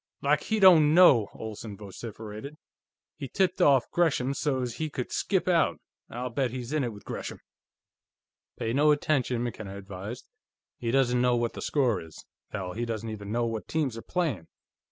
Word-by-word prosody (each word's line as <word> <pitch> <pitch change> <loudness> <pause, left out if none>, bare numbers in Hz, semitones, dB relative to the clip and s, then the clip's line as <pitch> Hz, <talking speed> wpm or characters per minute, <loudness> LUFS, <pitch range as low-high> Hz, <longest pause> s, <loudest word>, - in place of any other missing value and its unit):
"Like - - +3
he 220 -1 0
don't 160 -6 +7
know!" 135 - +7
Olsen 110 -1 -7
vociferated. 110 +6 -8 0.6
"He 140 -3 -5
tipped 185 +3 0
off 140 -6 +4
Gresham 140 -6 +1
so's 130 -4 -1
he 155 -1 -2
could 125 -4 -5
skip - - 0
out; - - +2 0.3
I'll 125 +1 -4
bet 130 +1 0
he's 125 +2 -6
in 155 -2 +1
it 120 - -2
with 105 -1 -13
Gresham!" - - -6 1.2
"Pay 115 0 -2
no 145 +3 +4
attention," 135 -5 +1
McKenna 110 -5 -5
advised. 100 +4 -8 0.5
"He 115 - -2
doesn't 125 -1 +2
know 125 -1 +3
what 120 -1 -1
the - - -7
score 125 -9 +1
is; 80 -1 -12 0.2
hell, 95 -4 -5
he 115 - -3
doesn't 115 -1 -3
even 100 -1 -7
know 120 +1 +1
what 115 -2 -4
teams 145 -7 -1
are 115 - -6
playing." 140 - -2
120 Hz, 175 wpm, -28 LUFS, 110-145 Hz, 1.2 s, don't